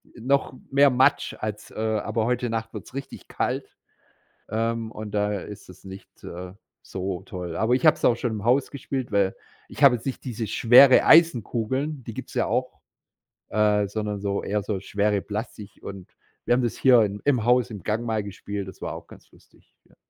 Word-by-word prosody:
noch 130 +3 0 0.2
mehr 140 +1 +6
Matsch 130 +1 +2
als, 105 -1 -5
äh - - -16
aber 110 0 -1
heute 125 0 -1
Nacht 115 0 -4
wird's - - -9
richtig 135 0 -8
kalt, - - -3 0.7
ähm, 115 +1 -2
und 110 -1 -7
da 105 -1 0
ist 105 -2 -10
es 90 - -15
nicht, 95 0 -13
äh, 90 +1 -8 0.3
so 95 -1 -5
toll. 90 -1 -6
Aber 115 +3 +1
ich 130 - +1
habe - - +6
es - - -2
auch 120 - +4
schon 120 -1 -2
im 105 -2 -5
Haus 130 +3 +2
gespielt, 135 -4 -5
weil 100 -2 +1 0.3
ich - - -11
habe 130 -3 +8
jetzt 115 - -9
nicht 135 - -4
diese 120 -3 -4
schwere 125 +5 +7
Eisenkugeln, 135 -2 +3
die 115 - -7
gibt's - - -9
ja - - +2
auch, - - -2 0.7
äh, 105 -1 +2
sondern 105 0 -4
so 100 0 -2
eher 105 0 -1
so 100 -2 -3
schwere 100 0 0
Plastik 105 -1 -7
und 95 -2 -9 0.4
wir - - +3
haben 125 - +1
das 120 - -1
hier 125 -3 +6
in 100 0 -3
im 125 -6 +2
Haus 125 0 +3
im 100 -5 -9
Gang 110 +2 -1
mal 110 -3 -1
gespielt, 100 0 -6
das 95 - -12
war - - -4
auch - - -9
ganz - - -17
lustig, - - -25
ja. - - -26
110 Hz, 195 wpm, -24 LUFS, 100-125 Hz, 0.7 s, habe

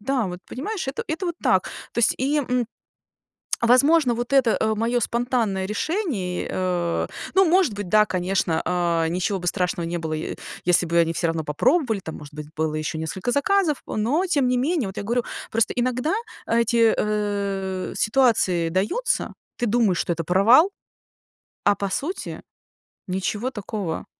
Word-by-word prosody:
Да, 250 +1 0
вот, 180 -1 -5
понимаешь, 355 - -4
это 270 - -3
это 325 +4 -2
вот 345 - -2
так, - - +3 0.3
то - - -5
есть, 235 - +4
и, 285 +3 +1
м, 250 -4 0 1.0
возможно, 255 +3 +5
вот 240 +3 -3
это, 255 -5 +4
э, 220 0 +1
моё 235 +3 +1
спонтанное 235 -5 0
решение, 215 - -2
э 175 -2 -1 0.3
Ну, 385 0 +6
может 340 - +3
быть, 200 -3 -5
да, 215 0 +5
конечно, 180 -3 0
а, 170 -2 +1
ничего 185 +3 -1
бы 175 - -5
страшного 180 -2 0
не 175 - -2
было, 160 -1 -3
е 155 0 -4 0.3
если 175 0 +4
бы 170 - +1
они 165 0 +1
всё 170 - 0
равно 165 -1 -1
попробовали. 225 - +1
Там, 160 -3 -7
может 145 0 -12
быть, 150 0 -7
было 155 0 0
ещё 155 0 -3
несколько 185 +8 -3
заказов. 315 +1 +2
Но 255 - 0
тем 285 -7 +2
не 250 0 +2
менее, 290 - 0
вот 190 - -8
я - - -3
говорю, 235 +3 0 0.3
просто 225 0 +1
иногда 250 +6 0 0.3
эти, 230 0 +3
э, 200 -3 -2
ситуации 215 -9 +2
даются, 215 - 0 0.3
ты 240 - +2
думаешь, 210 -5 +2
что 175 - -1
это 165 0 -4
провал, 225 - +5 0.9
а 205 - +4
по 200 -1 -3
сути 320 - -4 0.7
ничего 205 +6 -2
такого. 205 -6 -4
215 Hz, 165 wpm, -23 LUFS, 180-255 Hz, 1.0 s, Ну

